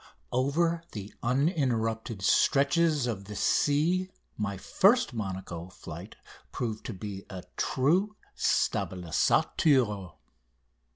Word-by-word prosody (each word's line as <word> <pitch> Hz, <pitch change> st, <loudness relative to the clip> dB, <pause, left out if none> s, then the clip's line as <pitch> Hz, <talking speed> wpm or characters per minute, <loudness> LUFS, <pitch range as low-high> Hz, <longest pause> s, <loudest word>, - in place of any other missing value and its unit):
Over 165 Hz, +7 st, +1 dB
the 105 Hz, -1 st, -7 dB
uninterrupted 120 Hz, -, 0 dB
stretches 145 Hz, +4 st, +3 dB
of 105 Hz, -5 st, -3 dB
the 105 Hz, +1 st, -8 dB
sea 165 Hz, -, +2 dB, 0.3 s
my 100 Hz, -2 st, -3 dB
first 210 Hz, -, +3 dB
Monaco 95 Hz, -5 st, -5 dB
flight -, -, -9 dB, 0.4 s
proved 110 Hz, -3 st, -3 dB
it -, -, -29 dB
to 115 Hz, -, -4 dB
be 100 Hz, 0 st, -6 dB
a 95 Hz, -2 st, -7 dB
true 180 Hz, +11 st, +1 dB, 0.2 s
stabilisateur. 100 Hz, -, +1 dB
120 Hz, 100 wpm, -29 LUFS, 100-155 Hz, 0.4 s, stretches